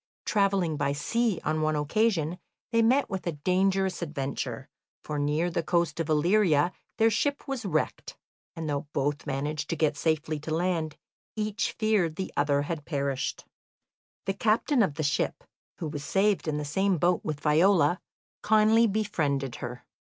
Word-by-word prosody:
Travelling 195 -6 +1
by 140 0 0
sea 220 +7 0
on 155 0 0
one 155 0 +1
occasion, 170 +2 +1 0.3
they 230 -1 +3
met 255 +5 +3
with 190 -2 -5
a 170 - 0
dangerous 190 +5 +1
adventure, 140 -5 -4 0.4
for 150 -1 -3
near 150 +4 0
the 170 - 0
coast 170 0 0
of 165 -1 -2
Illyria 170 0 +3 0.3
their 225 0 +4
ship 285 +7 -1
was 265 -5 -3
wrecked, - - -2 0.4
and 165 -2 -4
though 145 0 -2
both 145 0 -1
managed 145 +2 -2
to 165 - 0
get 155 -2 +1
safely 155 0 -1
to 155 +1 -3
land, 165 -3 -1 0.4
each 215 +1 -1
feared 210 -8 +1
the 190 - -5
other 145 0 +2
had 155 0 -4
perished. 140 -3 -2 0.8
The 195 - 0
captain 225 +6 +2
of 185 -9 +1
the 155 - -2
ship, 145 +2 -1 0.3
who 165 - -4
was 150 -1 -5
saved 195 +3 +1
in 150 -1 0
the 150 - -3
same 190 +5 +1
boat 175 +2 +2
with 150 -2 -3
Viola, 165 +2 +4 0.4
kindly 220 +2 +4
befriended 150 - -1
her. 125 0 -7
165 Hz, 160 wpm, -28 LUFS, 150-200 Hz, 0.8 s, their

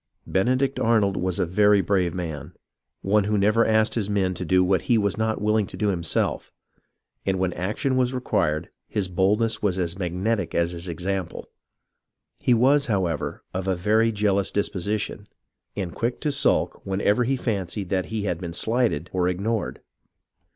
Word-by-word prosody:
Benedict 130 +7 +1
Arnold 110 -4 +2
was 90 -1 -1
a - - +1
very 105 +4 +4
brave 95 -3 +1
man, 80 -5 -5 0.5
one 100 +1 +2
who 105 +1 +1
never 105 +3 +3
asked 110 0 +3
his 105 -4 -1
men 95 -3 +1
to 90 - -5
do 90 +1 +3
what 95 -1 +2
he 120 - +5
was 100 -2 +1
not 110 0 -1
willing 105 -1 +1
to - - -10
do 105 - +1
himself, 85 -4 -1 0.7
and 95 -1 0
when 95 -1 0
action 105 +9 -1
was 125 -1 +2
required 85 -12 -1 0.2
his 100 -3 -1
boldness 100 +5 +1
was 95 -3 +1
as 90 0 -2
mag 90 -2 -3
netic 100 -2 -1
as 85 0 +1
his 85 +1 -7
example. 90 +2 -4 0.9
He 125 - +3
was, 140 +4 +3
however, 90 - -1
of 95 +1 -3
a 95 - +2
very 110 +5 +2
jealous 100 -2 +1
disposition, 105 +1 -2 0.5
and 95 -5 -4
quick 120 +1 -2
to 150 - 0
sulk 140 - +1
whenever 100 +4 +1
he 135 +3 +1
fancied 100 -5 -3
that 95 -1 0
he 110 -2 -3
had 90 -4 -2
been 85 -2 -5
shghted 110 - +1
or 90 -1 +1
ignored. 100 +5 -2
100 Hz, 170 wpm, -24 LUFS, 90-110 Hz, 0.9 s, he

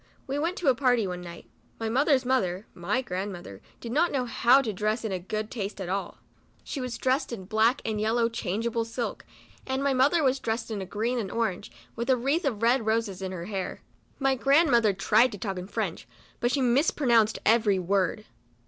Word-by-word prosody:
We 275 +2 -2
went 335 +4 -1
to 345 - -3
a 265 - +7
party 245 -3 +2
one 180 -1 -4
night. 170 -1 -10 0.3
My 225 - -2
mother's 265 +2 +2
mother, 200 -7 0
(my 205 +9 -1
grand 190 -1 -3
mother) 175 - -10 0.2
did 230 - -7
not 325 +7 +2
know 260 -3 0
how 245 +2 +4
to 220 -4 -2
dress 215 +4 -1
in 200 -3 -1
good 215 +2 -3
taste 205 -3 -4
at 185 -2 -4
all. 195 +1 -3 0.5
She 275 - -5
was 250 -2 -4
dressed 260 +3 0
in 220 -5 -5
a - - -13
black 220 +5 +2
and 215 -2 -1
yellow 230 +2 +2
changeable 230 +1 -2
silk, 230 +1 -5 0.4
and 265 +1 -1
my 280 -1 +2
mother 285 +6 +3
was 265 0 +2
dressed 225 -1 -3
in 210 -2 -3
a 190 - -6
green 230 +6 -1
and 200 -4 -3
orange, 205 -4 -2 0.2
with 235 +3 -4
a 260 - +5
wreath 280 +8 0
of 230 -6 -1
red 240 +1 +3
roses 220 -4 0
in 190 -1 -4
her 175 -2 -6
hair. 195 -2 -5 0.3
My 270 -1 +2
grand 275 +5 +3
mother 230 -3 +4
tried 215 +5 +3
to - - -6
talk 195 -2 -4
French, - - -3 0.3
but 240 - +1
she 275 - +1
mis 255 +6 +3
pronounced 230 -6 +3
every 215 -3 +4
word. 195 +3 0
230 Hz, 210 wpm, -27 LUFS, 200-260 Hz, 0.5 s, a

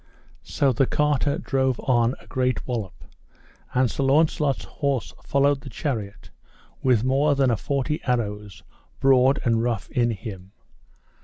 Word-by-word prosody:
So 135 -2 0
the 130 +3 +2
carter 150 -1 +1
drove 130 -2 0
on 120 0 +2
a - - -18
great 130 0 -1
wallop, 110 -8 -5 0.7
and 130 0 +4
Sir - - -3
Launcelot's 145 0 +2
horse 140 -5 -2
followed 140 0 +2
the 140 - -9
chariot, 110 -8 -5 0.5
with 125 -4 +3
more 140 +3 +2
than 135 -2 +2
a - - +2
forty 140 +5 -2
arrows 105 -6 -3 0.4
broad 135 0 +4
and 115 -1 +2
rough 115 -4 -2
in 120 -1 +1
him. 95 -3 -7
130 Hz, 140 wpm, -24 LUFS, 115-140 Hz, 0.7 s, and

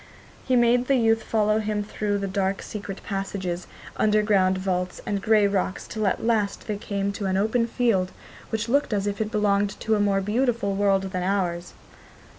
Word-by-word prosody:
He 260 - +3
made 240 +1 +3
the 275 - +4
youth 225 -2 +3
follow 215 -1 +1
him 210 -1 -1
through 205 0 -2
dark 195 0 -1
secret 200 -2 -7
passages, 195 -3 -4 0.3
underground 210 -3 +3
vaults, 180 -1 -2
and 200 -1 -2
grey 215 -1 +4
rocks 195 -2 -1
till 215 -1 -2
at 195 - -1
last 215 -3 0
they 210 -2 -3
came 200 -1 -2
to 200 0 -4
an 190 0 +1
open 220 +4 +1
field, 220 -7 +1 0.4
which 220 0 -2
looked 280 -1 +1
as 200 -1 0
if 205 +1 -2
it 215 - -1
belonged 205 -2 +1
to 220 - +1
a 215 - +2
more 200 -1 +2
beautiful 225 0 0
world 195 -1 +1
than 185 -1 -2
ours. 180 -2 -1
205 Hz, 180 wpm, -25 LUFS, 195-220 Hz, 0.4 s, the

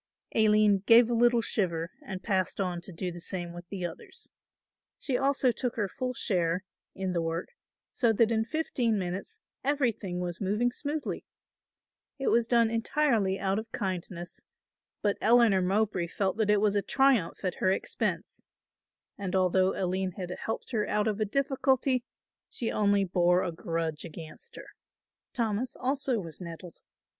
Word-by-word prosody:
Aline 215 -2 +5
gave 235 +1 +7
a - - +2
little 240 0 +4
shiver 170 -6 -1
and 190 -1 -6
passed 190 -3 0
on 180 -3 -1
to 190 - -8
do 180 +1 -4
the 175 0 -9
same 175 -1 -4
with 175 0 -10
the 190 -3 -4
others. 170 - -8 0.7
She 265 - -1
also 270 -1 +2
took 245 0 -3
her 210 -3 0
full 255 +6 -4
share 175 -3 0 0.3
in 190 -1 -2
the 170 - 0
work, 165 +1 -3 0.4
so 235 -4 +2
that 225 +1 +3
in 220 -1 +2
fifteen 240 -4 0
minutes 185 0 -5 0.2
everything 240 -10 0
was 175 0 -4
moving 210 +5 +1
smoothly. 295 +4 -3 0.9
It 270 - 0
was 235 -1 +3
done 235 -2 +4
entirely 230 -4 +1
out 195 +1 0
of 225 +1 -9
kindness, 180 -3 -4 0.6
but 205 -1 +1
Eleanor 225 -4 +5
Mowbray 190 -1 +1
felt 190 +2 -1
that 220 -2 +1
it 210 -1 +4
was 210 -1 +2
a 205 - +3
triumph 255 -9 +2
at 185 - -2
her 185 - +3
expense 190 - -2 0.7
and 195 -2 -3
although 185 0 +3
Aline 185 0 -1
had 180 -1 -6
helped 220 +7 -5
her 215 -4 0
out 210 +1 +1
of 215 -1 -1
a 215 - +2
difficulty, 265 +1 +1 0.5
she 235 - -2
only 205 -1 +3
bore 180 -1 +3
a 180 - -2
grudge 165 -2 -3
against 170 - -10
her. - - -10 0.6
Thomas 230 0 -1
also 265 -2 0
was 165 -2 -6
nettled. 170 0 -8
200 Hz, 160 wpm, -29 LUFS, 180-235 Hz, 0.9 s, gave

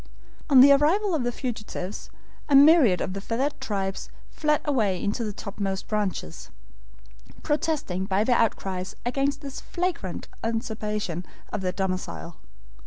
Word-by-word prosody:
On 265 -3 +8
the 280 +2 +9
arrival 340 +8 +3
of 300 -6 0
the 245 - 0
fugitives 215 -6 -5 0.4
a 285 - +5
myriad 280 - +7
of 185 - -2
the 195 - -5
feathered 265 +7 -2
tribes 195 -6 -3 0.2
fled 300 -1 +1
away 215 - +1
into 210 +5 -1
the 215 - -2
topmost 195 -1 -4
branches, 200 - -3 0.9
protesting 295 - -1
by 195 +1 +1
their 245 +2 +3
outcries 190 -4 -1
against 275 +3 0
this 275 -2 -7
flagrant 345 - -3 0.2
usurpation 215 -5 -2 0.3
of 210 - -2
their 185 -1 0
domicile. 185 -3 -4
220 Hz, 135 wpm, -26 LUFS, 195-280 Hz, 0.9 s, the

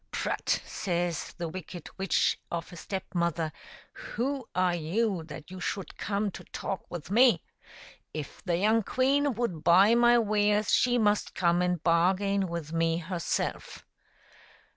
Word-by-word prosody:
'* - - -45
Prut - - -1
!" - - -21
says 175 -2 -2
the 170 - -3
wicked 175 0 -8
witch 195 -1 +2
of 170 0 -5
a - - -8
Step 190 +2 -5
mother, 170 -2 0 0.3
" - - -24
who 265 +1 -3
are 180 -1 +2
you 180 +4 0
that 155 +1 -10
you 185 - -7
should 195 +1 -4
come 205 0 -1
to - - -10
talk 195 - -5
with 175 0 -7
me? 235 -5 +5 0.7
If 150 -2 -7
the 175 -3 0
young 215 +4 +3
queen 270 +4 +1
would 195 -9 -2
buy 185 +6 +6
my 240 0 +5
wares 210 -1 +2
she 245 0 +4
must 210 -2 +1
come 175 -1 +2
and 180 -2 0
bargain 190 +3 +2
with 170 -2 -5
me 165 0 +1
herself.'' 175 0 -3
185 Hz, 160 wpm, -29 LUFS, 170-210 Hz, 0.7 s, buy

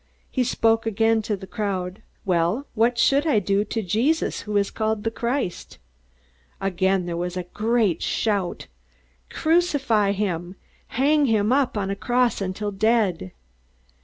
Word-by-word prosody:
He 255 - +1
spoke 225 -1 +1
again 225 +1 +2
to 210 -1 -2
the 190 - -9
crowd, 190 -1 -3 0.2
"Well, 180 +8 +1
what 235 +2 +2
shall 280 +5 +3
I 295 - +3
do 200 0 +1
to 225 0 -3
Jesus 240 - 0
who 210 -1 -2
is 200 0 +1
called 220 -1 -1
the 225 - -1
Christ?" 235 -5 -3 0.8
Again 190 -1 0
there 175 -1 -3
was 175 +1 -3
a 180 - -2
great 210 -1 0
shout: 200 -5 -1 0.6
"Crucify 285 - +2
him! 185 -3 -3 0.3
Hang 285 +3 +2
him 215 -1 +2
up 265 -4 +1
on 195 -1 -1
a - - -2
cross 245 +3 +1
till 200 +2 -3
he - - -11
is - - -20
dead!" 210 - +1
210 Hz, 155 wpm, -23 LUFS, 190-235 Hz, 0.8 s, shall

